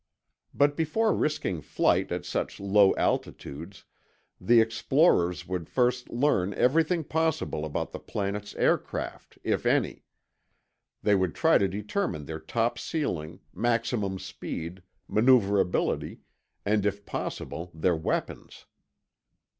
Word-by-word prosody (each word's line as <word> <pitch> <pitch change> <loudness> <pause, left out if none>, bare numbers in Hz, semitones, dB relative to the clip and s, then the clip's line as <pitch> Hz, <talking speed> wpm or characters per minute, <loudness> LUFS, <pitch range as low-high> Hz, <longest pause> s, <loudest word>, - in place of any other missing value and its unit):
But 145 0 +2
before 205 +8 +1
risking 95 - -1
flight - - +1
at - - -3
such - - -3
low 100 0 +4
altitudes, 85 +8 -3 0.5
the 120 0 +5
explorers 115 - +2
would 90 -3 -4
first 125 -1 +1
learn 110 -7 +1
everything 160 +5 +2
possible 160 - -1
about 75 - -3
the - - -6
planet's 105 0 -4
aircraft, - - -1
if - - 0
any. - - +1 1.0
They 105 - +4
would 95 -5 +1
try - - +4
to 100 - +2
determine 100 - -3
their 80 +2 -6
top 115 +5 -1
ceiling, 85 - -3
maximum 115 -4 0
speed, 90 0 -6 0.3
maneuverability, 105 -5 +2 0.4
and 105 0 +2
if 100 0 -2
possible 85 +2 -5
their 85 +2 +1
weapons. 80 - -4
105 Hz, 115 wpm, -28 LUFS, 90-130 Hz, 1.0 s, the